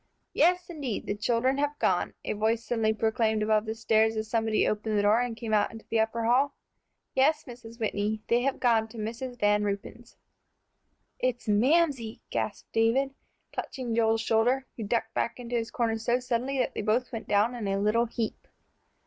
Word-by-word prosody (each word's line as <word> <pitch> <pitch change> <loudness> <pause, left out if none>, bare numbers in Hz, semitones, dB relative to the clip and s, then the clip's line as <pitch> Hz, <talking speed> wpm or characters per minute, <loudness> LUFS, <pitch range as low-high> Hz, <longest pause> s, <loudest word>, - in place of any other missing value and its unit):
"Yes, 360 0 +3
indeed, 285 - -4
the - - -1
children 240 +5 +1
have 290 +1 0
gone," - - 0
a - - -1
voice 220 +2 0
suddenly 225 -2 +1
proclaimed 220 0 +1
above 215 0 +2
the 220 - -2
stairs, 220 0 +2
as 215 0 -2
somebody 225 -1 +1
opened 215 0 -1
the 205 - +2
door 210 +3 +4
and 245 -2 -3
came 220 -1 -4
out 210 -1 +3
into 225 -1 -11
the 225 - +2
upper 225 +1 0
hall. 265 +5 +3 0.6
"Yes, 275 +4 +3
Mrs. 235 -2 -11
Whitney, 215 0 -1
they 235 +1 +3
have 270 +1 -1
gone 230 -3 +3
to 225 +1 -13
Mrs. 235 +3 -5
Van 210 0 +3
Ruypen's." 210 +4 -5 1.0
"It's 250 -2 -1
Mamsie," 250 +1 +2
gasped - - -3
David, 245 +5 +2 0.4
clutching 250 -3 -4
Joel's 225 -1 +2
shoulders, 230 +4 +2
who 225 - -5
ducked 225 +1 -1
back 235 - -2
into 245 0 -4
his 230 -1 -1
corner 225 -2 -1
so 240 +2 +1
suddenly 255 +2 -1
that 255 - 0
they - - -3
both 220 +4 0
went 225 - -6
down 210 +4 +2
in 230 -4 -4
a 195 0 0
little 210 +4 +2
heap. 230 -1 -4
225 Hz, 185 wpm, -28 LUFS, 220-245 Hz, 1.0 s, door